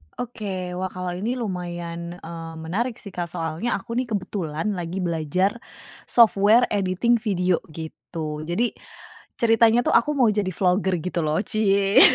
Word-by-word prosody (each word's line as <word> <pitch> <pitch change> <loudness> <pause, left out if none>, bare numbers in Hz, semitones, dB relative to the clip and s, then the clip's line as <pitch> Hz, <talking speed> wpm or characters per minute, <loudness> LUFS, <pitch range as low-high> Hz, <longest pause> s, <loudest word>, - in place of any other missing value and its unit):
Oke, 195 -7 -4
wah 185 - -1
kalau 180 -1 -3
ini 230 +6 -1
lumayan, 175 -5 -4
eee, 165 0 -7
menarik 200 +10 -2
sih, 205 -4 -10
Kak, 175 -1 -3
soalnya 165 +6 -2
aku 230 +4 -7
nih, 255 - -2
kebetulan 185 -2 -2
lagi 180 0 -3
belajar, 175 +6 0 0.5
software 220 0 +5
editing 205 +4 +2
video 185 -5 +1
gitu. 155 -1 -6
Jadi, 225 +8 +1 0.7
ceritanya 225 0 +5
tuh - - +2
aku 235 +6 +4
mau 250 -3 +5
jadi 200 -2 0
vlogger 185 +1 +1
gitu 175 +1 -3
loh, 155 0 +1
ciye. 200 -2 +4
185 Hz, 145 wpm, -24 LUFS, 170-220 Hz, 0.7 s, software